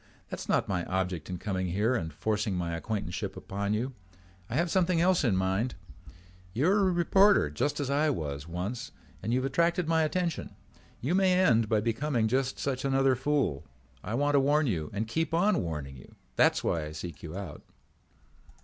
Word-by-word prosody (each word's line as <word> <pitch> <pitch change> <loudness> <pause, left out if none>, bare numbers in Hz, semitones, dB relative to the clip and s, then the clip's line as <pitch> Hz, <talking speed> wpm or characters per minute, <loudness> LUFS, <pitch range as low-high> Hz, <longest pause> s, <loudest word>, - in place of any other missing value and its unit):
"That - - -4
is - - -8
not - - +2
my 90 -3 -1
object 90 -3 -2
in 90 - -3
coming 95 0 -2
here 105 +7 +1
and 80 -10 -2
forcing 105 +5 -1
my 85 -2 -2
acquaintanceship 100 0 -4
upon 100 +1 -2
you. 125 +5 -2 0.6
I 115 - -3
have 170 +3 +1
something 180 -2 +2
else 180 0 +3
in 115 -7 +2
mind. 95 +6 0 0.8
You 145 +9 +2
are 205 - +3
a 190 -2 +3
reporter 185 - +4
just 135 - -1
as 140 -2 -1
I 150 +2 +2
was 75 - -3
once 95 +8 -4 0.3
and 110 - -2
you 125 - +3
have 130 - -1
attracted 170 +4 +1
my 160 0 +3
attention. 170 +1 -2 0.5
You 140 +8 0
may 190 -1 +4
end 120 - +3
by 110 -2 +2
becoming 115 +1 0
just 130 +3 0
such 130 -2 -2
another 135 -1 +3
fool. 130 - 0 0.4
I 110 - -3
want 145 +3 +1
to 140 - +5
warn 145 +3 +3
you 80 - -1
and 105 +2 -3
keep 160 +7 -1
on 190 +1 +3
warning 75 -5 -5
you. - - -15 0.2
That's - - +3
why 80 -2 0
I 75 - -7
seek 85 +2 -7
you 80 +2 -7
out." 95 -7 -7
120 Hz, 195 wpm, -29 LUFS, 95-150 Hz, 0.8 s, to